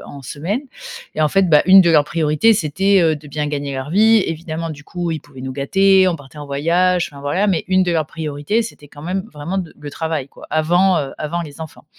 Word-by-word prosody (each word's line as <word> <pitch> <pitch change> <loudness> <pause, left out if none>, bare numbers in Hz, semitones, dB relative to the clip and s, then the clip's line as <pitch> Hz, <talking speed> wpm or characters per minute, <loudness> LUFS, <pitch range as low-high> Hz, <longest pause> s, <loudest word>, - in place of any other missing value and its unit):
en 140 - -10
semaine 165 - -3 0.5
et 155 - -3
en 155 - +3
fait, 195 +1 +2
bah, 150 -1 +6
une 190 +1 +9
de 170 - +3
leurs 150 -3 +5
priorités, 155 +7 +2
c'était, 195 +3 +2
heu, 160 -2 +3
de 150 0 -13
bien 150 +1 -3
gagner 145 -1 -3
leur 130 +2 -5
vie, 220 +3 +5
évidemment. 165 0 -4
Du 150 -1 -10
coup, 175 0 -4
ils 160 -3 -3
pouvaient 140 -3 -14
nous 130 - -5
gâter, 190 +7 +3
on 175 - -1
partait 145 -1 -15
en 145 - -7
voyage, 170 +5 +1
enfin, 140 - -11
voilà. 175 +9 0
Mais, 185 -6 0
une 185 0 +3
de 175 -1 0
leurs 160 -2 0
priorités, 155 +8 -2
c'était 150 -10 -10
quand 145 +1 -13
même 185 +3 -3
vraiment 155 +6 -4
de 175 -4 -6
le 145 -1 -8
travail, 160 -3 -3
quoi, - - -14
avant, 175 +4 +2
heu, 135 -2 -4
avant 170 +3 -3
les 150 0 -11
enfants. 160 -1 -10
160 Hz, 240 wpm, -19 LUFS, 145-185 Hz, 0.5 s, une